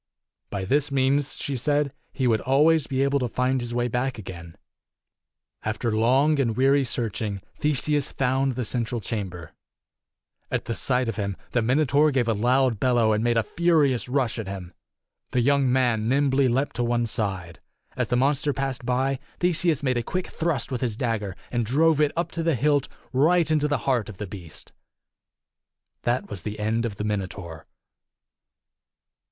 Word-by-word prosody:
By 100 -2 -3
this 145 +6 +1
means, 135 +1 +1
she 140 - -3
said, 145 +2 0 0.2
he 130 - -2
would 115 -3 +2
always 150 +3 +3
be 135 -1 0
able 140 0 +2
to 125 -2 -1
find 125 +2 0
his 120 0 -5
way. 120 0 0
back 125 +2 -1
again. 85 -5 -9 1.1
After 110 +1 -2
long 135 +7 +3
and 115 -4 0
weary 135 +2 +4
searching, 110 -4 -2 0.2
Theseus 150 -1 +1
found 135 0 +1
the 125 -1 -2
central 120 +1 -1
chamber. 95 -6 -5 1.0
At - - -2
sight 125 -1 +1
of 115 -2 -3
him, 100 -2 -2
the 120 - +1
Minotaur 145 +5 +3
gave 130 -4 +1
a 115 - +2
loud 125 +1 +2
bellow 120 -3 +3
and 105 +1 0
made 120 -1 +2
a 115 - +3
furious 150 -8 +2
rush 125 -3 0
at 110 - -5
him. 95 -2 -7 0.6
The 125 - +3
young 140 0 +3
man 120 -4 +2
nimbly 135 0 +3
276 120 - +1
leaped 135 +2 -1
to 120 - +1
one 120 0 +1
side. 95 -7 -3 0.4
As - - -1
the 120 - +1
monster 140 +2 +1
passed 135 -2 -3
by, 130 +2 0 0.2
Theseus 170 -4 +1
made 130 -3 +1
a - - +1
quick 180 +10 -3
thrust 155 -8 -2
with 125 - -2
his 115 -4 -1
dagger, 110 -7 -2 0.2
and 120 -1 0
drove 150 +6 +3
it 150 -1 +3
up 170 +1 -1
to 165 - -3
the 165 -2 +1
hilt 145 +2 +2 0.3
right 160 +5 +3
into 150 -1 +2
the 145 -1 +1
heart 120 -6 +1
of 100 - -9
the 105 - -4
beast. 90 -5 -10 1.3
That 120 +1 0
was 100 -4 -6
the 105 +4 -5
end 110 +2 0
of 105 - -7
the 105 - -4
Minotaur. 95 -6 -4
125 Hz, 175 wpm, -25 LUFS, 110-140 Hz, 1.3 s, weary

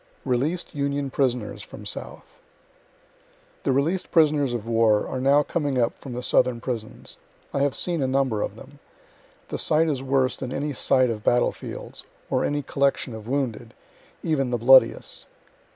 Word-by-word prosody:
RELEAS'D 140 +8 -1
UNION 140 -1 -2
PRISONERS 125 -5 -1
FROM - - -11
SOUTH - - -6 1.4
The - - 0
releas'd 155 +8 0
prisoners 150 -6 +3
of 115 -3 -4
war 115 -2 +3
are 130 - -3
now 140 +2 +4
coming 145 -4 -1
up 120 -1 +1
from 130 - -8
the 125 +1 -4
southern 125 -1 +2
prisons. 115 -3 -5 0.4
I - - 0
have 140 -1 +1
seen 170 -4 -2
a 135 - +1
number 130 -5 +1
of 100 - -3
them. 140 +5 -14 0.7
The - - -4
sight 160 +1 +2
is 140 -4 -1
worse 135 -1 +1
than 130 -2 -5
any 145 +2 -2
sight 130 -1 +3
of 105 -2 -5
battle 120 0 +3
fields, - - -8 0.3
or - - +2
any 145 0 -1
collection 140 -2 0
of 110 0 -9
wounded, 130 -4 -2 0.5
even 135 -5 0
the 120 - 0
bloodiest. 130 +3 +4
135 Hz, 165 wpm, -24 LUFS, 120-145 Hz, 1.4 s, now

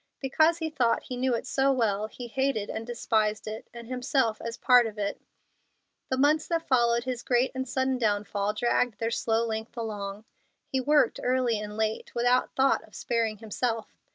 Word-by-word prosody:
Because 315 +5 +3
he 320 -2 -3
thought 245 -6 +1
he 250 - -6
knew 250 0 +1
it - - -4
so 270 0 +2
well 215 -5 +1
he 245 +3 -9
hated 265 -4 -1
and 225 +1 -5
despised 215 -3 0
it, 215 +1 -6
and 235 -1 -9
himself 250 -2 0
as 230 0 -5
part 250 -2 +5
of 215 -1 -8
it. 200 -1 -3 0.9
The 260 - 0
months 305 +3 +3
that 330 -1 -1
followed 235 -2 +3
his 250 -2 -3
great 245 +1 +2
and 260 -1 -4
sudden 260 0 0
downfall 205 -1 0
dragged 240 0 +1
their 225 0 -1
slow 230 0 +1
length 220 +1 -5
along. 210 -2 -5 0.4
He 265 - -1
worked 290 -2 +3
early 250 -3 +1
and 210 0 -6
late, 220 0 -2
without 245 +1 +2
thought 270 +1 +3
of - - -17
sparing 225 -2 -1
himself. 225 +1 -3
235 Hz, 180 wpm, -28 LUFS, 220-260 Hz, 0.9 s, part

